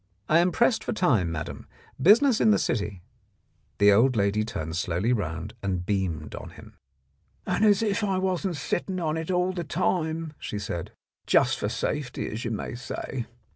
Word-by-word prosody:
I 160 - +5
am 180 +1 +3
pressed 235 +5 +2
for - - -2
time, 120 - +2
madam. 80 -2 -6 0.3
Business 225 - +6
in - - +5
the 215 - +5
city 100 -5 -2 0.4
" - - -42
The 100 0 +6
old 120 +6 +4
lady 100 +1 +2
turned 80 -8 -4
slowly 90 +7 0
round 85 -2 -3
and 90 -3 -2
beamed 90 -7 -2
on - - -7
him. - - -14 0.7
"And - - 0
if 210 0 +3
I 195 -2 +1
wasn't 185 -1 -1
sitting 185 +5 -2
on 160 -2 -1
it 160 +1 -4
all 180 0 +1
the 175 -2 -3
time," 160 -1 -1
she 105 - -5
said, 90 -5 -4 0.4
"just - - +3
for - - -1
safety, 145 -4 -3
as 110 +3 -5
you 115 - -2
may 110 - -4
say. 120 0 -5
130 Hz, 175 wpm, -26 LUFS, -, 0.7 s, Business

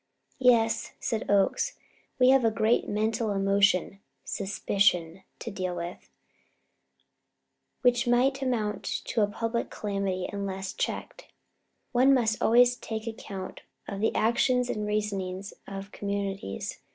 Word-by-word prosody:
"Yes," 235 -3 +3
said 225 -4 -2
Oakes, 200 -1 +2 0.4
"we 255 -1 +5
have 270 0 +6
here 225 - +3
a 220 - -9
great 220 +2 +2
mental 220 +2 0
emotion 195 -1 +2 0.2
suspicion 190 -3 0 0.2
to - - -6
deal 185 -2 -3
with, 175 +1 -7 1.7
which 245 0 +3
may 245 +3 +4
amount 230 -5 -1 0.2
to 230 - 0
a 205 - +4
public 230 +3 -2
calamity 195 -3 -2
unless 195 -1 -4
checked. - - -4 0.6
One 260 +3 +5
must 225 -4 +1
always 245 +2 +5
take 220 0 -5
account 200 -4 -7 0.3
of 200 - -5
the 220 - +1
actions 250 +2 +2
and 210 0 -3
reasonings 195 -2 -2
of 195 +1 -7
communities. 200 - -4
210 Hz, 125 wpm, -28 LUFS, 195-235 Hz, 1.7 s, have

